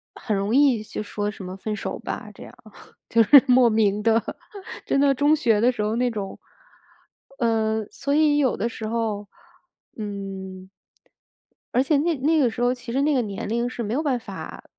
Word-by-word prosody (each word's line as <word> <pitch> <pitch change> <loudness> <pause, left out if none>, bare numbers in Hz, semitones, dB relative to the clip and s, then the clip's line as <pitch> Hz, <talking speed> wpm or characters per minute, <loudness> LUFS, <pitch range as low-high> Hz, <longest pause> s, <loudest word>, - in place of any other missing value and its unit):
很 215 -4 -3
容 200 +5 0
易 270 -6 +4
就 215 - -6
说 205 0 -3
什 200 -2 -9
么 185 +1 -7
分 210 +2 -4
手 - - -5
吧， - - -6
这 - - -12
样。 - - -13 0.5
就 230 - +4
是 275 +4 +8
莫 250 -1 +5
名 210 -2 +1
地 225 0 +3 0.6
真 275 - +1
的 280 -1 +4
中 290 +3 +3
学 225 -8 +2
的 245 +2 +4
时 240 - -5
候 215 +2 -1
那 245 +1 +1
种 205 -4 -5 1.0
呃， 220 -2 0
所 280 +1 -3
以 300 -1 +4
有 270 -4 +2
的 230 +3 -2
时 220 -1 -6
候， 220 -3 -2 0.7
嗯 195 -2 -7 1.1
而 255 - +4
且 290 +1 +2
那 325 +2 +1
那 310 +3 +2
个 250 -4 +3
时 235 - -6
候， 245 +1 +3
其 245 -1 -8
实 270 - +1
那 295 +1 +2
个 255 - +2
年 205 -2 -5
龄 235 +2 0
是 240 -2 -5
没 215 +2 -3
有 295 - 0
办 275 -5 0
法 200 -5 -9
230 Hz, 210 characters per minute, -23 LUFS, 210-265 Hz, 1.1 s, 是